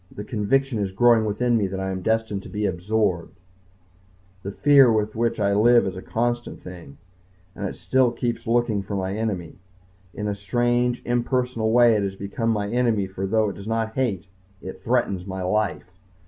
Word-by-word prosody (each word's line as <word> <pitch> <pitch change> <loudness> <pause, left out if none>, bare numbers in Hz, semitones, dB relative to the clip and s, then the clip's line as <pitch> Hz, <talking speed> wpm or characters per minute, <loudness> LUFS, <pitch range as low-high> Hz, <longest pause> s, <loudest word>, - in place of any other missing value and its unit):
The 105 - -7
conviction 120 +3 0
is 100 -2 -2
growing 115 +1 +4
within 120 +3 0
me 100 -3 0
that 95 0 -5
I 95 0 -2
am 95 0 -4
destined 110 -1 -1
to - - -11
be 105 0 -2
absorbed. 95 -1 -1 1.0
The 100 - -5
fear 135 +3 +5
with 110 -1 0
which 115 0 0
I 100 -1 +2
live 120 +3 +5
is 95 -1 -3
a 95 - -7
constant 120 +3 -2
thing. 85 -6 -11 0.6
And 100 - -3
I - - -4
still 130 -1 +2
keep 120 -1 -3
looking 115 -3 +1
for 100 +1 -5
my 95 0 -2
enemy. 100 -7 -4 0.6
In 105 - -3
a 105 - -1
strange, 120 +4 0
impersonal 120 -2 0
way 120 0 +6
it 105 - +1
has 100 -1 -3
become 100 +4 -3
my 105 -2 0
enemy 115 -3 +1
for 95 0 -5
though 110 +1 +2
it - - -7
does 100 - -9
not 115 0 -1
hate, 110 -8 -1 0.3
it 95 0 -9
threatens 105 -6 0
my 95 -1 -4
life. 95 -1 -1
110 Hz, 190 wpm, -23 LUFS, 95-120 Hz, 1.0 s, way